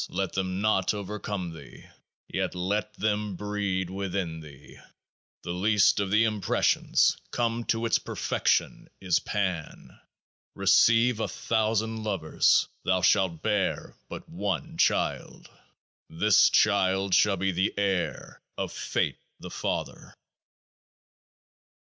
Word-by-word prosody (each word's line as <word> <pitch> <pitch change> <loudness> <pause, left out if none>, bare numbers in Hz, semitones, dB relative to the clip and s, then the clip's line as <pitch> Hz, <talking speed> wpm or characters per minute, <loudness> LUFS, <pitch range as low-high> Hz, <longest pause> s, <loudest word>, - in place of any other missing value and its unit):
Let 95 -2 -3
them 95 0 -2
not 105 -2 +1
over 105 +1 -5
come 95 -5 -4
thee; 80 - -13 0.4
yet - - -3
let 100 +4 -2
them 105 -2 -1
breed 100 -2 -2
within 95 -4 -3
thee. 75 -3 -14 0.6
The 85 - -4
least 100 +3 +3
of 100 -1 -1
the 105 +3 +4
impressions, 105 -4 +2
come 115 -1 -1
to 115 0 0
its 115 - +2
perfection, - - -1
is 90 -3 +1
Pan. 95 -6 -4 0.6
Receive 115 +4 +4
a - - -1
thousand 110 0 -1
lovers; 95 -7 +2 0.2
thou 95 -1 +1
shalt 95 -6 +2
bear 105 -3 -1
but - - -8
One - - -4
Child. - - 0 0.6
This 105 +5 +4
child 95 -1 +2
shall 100 +1 +4
be 95 +2 0
the 95 +2 0
heir 95 -3 -2 0.2
of - - -3
Fate - - -2 0.2
the - - -9
Father. - - -4
100 Hz, 120 wpm, -27 LUFS, 95-105 Hz, 0.6 s, the